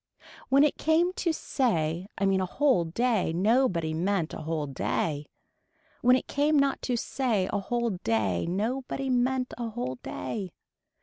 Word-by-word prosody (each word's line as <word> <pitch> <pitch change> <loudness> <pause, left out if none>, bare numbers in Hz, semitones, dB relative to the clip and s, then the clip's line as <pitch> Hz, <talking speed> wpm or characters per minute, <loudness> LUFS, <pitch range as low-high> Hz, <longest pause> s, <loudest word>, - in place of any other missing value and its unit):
When 275 +2 +6
it 300 - +1
came 335 +3 +2
to 345 -2 0
say 180 - -1
I 200 - +1
mean 195 -1 +2
a - - 0
whole 260 -5 +2
day 220 +2 +1
nobody 185 -4 +2
meant 175 0 0
a - - -6
whole 155 -1 -2
day. 145 +2 -2 0.7
When 250 +1 +6
it 255 - -1
came 295 +1 +2
not 275 -1 +2
to 245 - +2
say 230 -6 0
a 205 - +1
whole 235 +3 -1
day 105 - 0
nobody 255 +8 -2
meant 255 +1 +1
a 235 -1 -2
whole 210 - -4
day. 180 +7 -5
220 Hz, 160 wpm, -28 LUFS, 165-260 Hz, 0.7 s, When